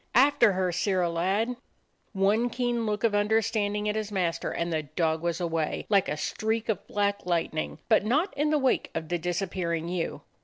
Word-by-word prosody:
"After 250 -4 +5
her, 185 -1 0
Sirrah 180 -1 +1
lad!" 200 +8 0 0.5
One 210 +4 +2
keen 240 -2 -1
look 210 +1 -2
of 230 -2 +3
understanding 210 0 +1
at 210 - 0
his 215 -1 -3
mas 170 -4 0
ter, - - -3
and 170 0 -2
the 155 - +1
dog 160 +2 -1
was 170 0 -1
away, 165 -3 -1
like 200 -3 +3
a 150 - -2
streak 220 +7 -2
of 210 - -2
black 205 0 0
lightning; 165 -3 -1
but 220 -3 +4
not 290 - +1
in 295 +1 +1
the 305 - +3
wake 265 -3 +1
of 160 -1 -4
the 175 0 0
disappearing 175 -1 -2
ewe. 175 -2 -3
200 Hz, 190 wpm, -27 LUFS, 170-220 Hz, 0.5 s, After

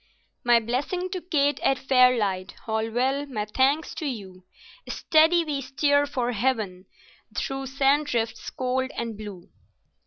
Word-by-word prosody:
My 240 -1 +5
blessing 285 +11 -2
to 370 - -3
Kate 290 -5 +1
at 270 - +2
Fairlight—Holwell, 250 +1 +1
my 215 -6 -3
thanks 265 +8 +1
to 310 - -4
you; 195 -8 -6 0.5
Steady! 325 +2 +3
We 290 -3 -2
steer 285 +2 +2
for 250 -4 -1
heaven, 215 -6 -1 0.5
through 270 0 -2
sand 275 +3 +2
drifts 230 -5 -2
cold 260 +1 -1
and 230 -2 -3
blue." 205 -4 -9
260 Hz, 125 wpm, -25 LUFS, 225-285 Hz, 0.5 s, My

